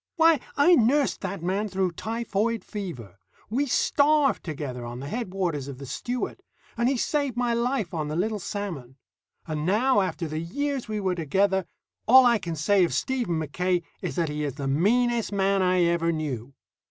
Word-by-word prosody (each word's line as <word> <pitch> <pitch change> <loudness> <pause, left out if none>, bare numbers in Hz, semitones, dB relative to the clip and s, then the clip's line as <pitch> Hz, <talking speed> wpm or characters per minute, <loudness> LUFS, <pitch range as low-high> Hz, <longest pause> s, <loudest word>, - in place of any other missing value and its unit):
Why, 325 -2 +5 0.2
I 290 +5 +6
nursed 275 0 +3
that 195 -3 -4
man 195 +4 0
through 190 -1 0
typhoid 225 +3 -2
fever; 125 - -7 0.3
we 280 +5 +1
starved 290 +2 +3
together 140 -6 -5
on 120 +1 -6
the 140 - -6
headwaters 180 - -2
of 140 -2 -7
the 140 - -8
Stewart; 245 - -4 0.3
and 235 +2 +2
he 270 - +1
saved 280 -1 -1
my 245 -1 +1
life 235 -5 -1
on 155 -3 -2
the 150 - -3
Little 210 +5 -1
Salmon. 175 - -5 0.5
And 155 -2 -3
now, 215 +7 +3
after 180 -3 -2
the 155 +1 -3
years 275 - -3
we 215 -1 -2
were 190 -2 0
together, 190 +4 +1 0.4
all 260 +2 +8
I 235 -2 +4
can 170 -4 -4
say 185 +6 +3
of 170 - 0
Stephen 245 -11 -1
Mackaye 175 +4 -1 0.2
is - - -4
that 170 -4 0
he 150 0 -3
is 140 -3 -3
the 140 -2 -4
meanest 230 - +2
man 195 -1 +2
I 180 -1 +3
ever 170 -1 +2
knew. 140 -5 -4
190 Hz, 180 wpm, -26 LUFS, 160-235 Hz, 0.5 s, all